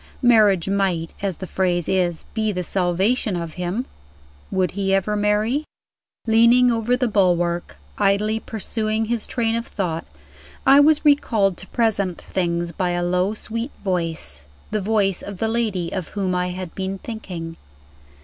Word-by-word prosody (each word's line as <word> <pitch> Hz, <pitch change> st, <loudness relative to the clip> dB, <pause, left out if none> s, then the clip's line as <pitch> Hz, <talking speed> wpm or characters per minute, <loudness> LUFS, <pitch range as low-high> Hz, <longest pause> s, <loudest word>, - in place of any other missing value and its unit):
Marriage 210 Hz, -7 st, +5 dB
might, 190 Hz, -4 st, 0 dB
as 195 Hz, -4 st, -2 dB
the 190 Hz, -, -6 dB
phrase 180 Hz, -2 st, 0 dB
is, 175 Hz, -3 st, 0 dB
be 220 Hz, -1 st, 0 dB
the 180 Hz, -2 st, -3 dB
salvation 190 Hz, +5 st, +1 dB
of 170 Hz, -2 st, -4 dB
him. 180 Hz, +7 st, -3 dB, 0.6 s
Would 185 Hz, -2 st, 0 dB
he 195 Hz, 0 st, +1 dB
ever 195 Hz, +2 st, 0 dB
marry? 210 Hz, +7 st, +1 dB, 0.6 s
Leaning 235 Hz, +2 st, +5 dB
over 235 Hz, +2 st, +1 dB
the 250 Hz, -1 st, +1 dB
bulwark, 175 Hz, -, +1 dB, 0.2 s
idly 210 Hz, +3 st, +2 dB
pursuing 220 Hz, 0 st, -2 dB
this 230 Hz, 0 st, -2 dB
train 230 Hz, -2 st, 0 dB
of 230 Hz, 0 st, -3 dB
thought, 170 Hz, -5 st, -3 dB, 0.6 s
I 275 Hz, +1 st, +7 dB
was 305 Hz, +1 st, +4 dB
recalled 225 Hz, -10 st, +3 dB
to 190 Hz, -, -11 dB
present 200 Hz, -6 st, 0 dB
things 170 Hz, -2 st, -2 dB
by 180 Hz, +2 st, -1 dB
a 175 Hz, -, -1 dB
low 180 Hz, +4 st, +1 dB
sweet 230 Hz, +4 st, -4 dB
voice 165 Hz, -, -2 dB, 0.3 s
the 215 Hz, -, 0 dB
voice 200 Hz, -2 st, +1 dB
of 200 Hz, -1 st, -7 dB
the 225 Hz, -, 0 dB
lady 220 Hz, -7 st, -1 dB
of 185 Hz, -4 st, -3 dB
whom 195 Hz, -3 st, -2 dB
I 180 Hz, 0 st, 0 dB
had 180 Hz, -1 st, -6 dB
been 190 Hz, 0 st, -3 dB
thinking. 180 Hz, -7 st, -7 dB
195 Hz, 155 wpm, -22 LUFS, 180-225 Hz, 0.6 s, I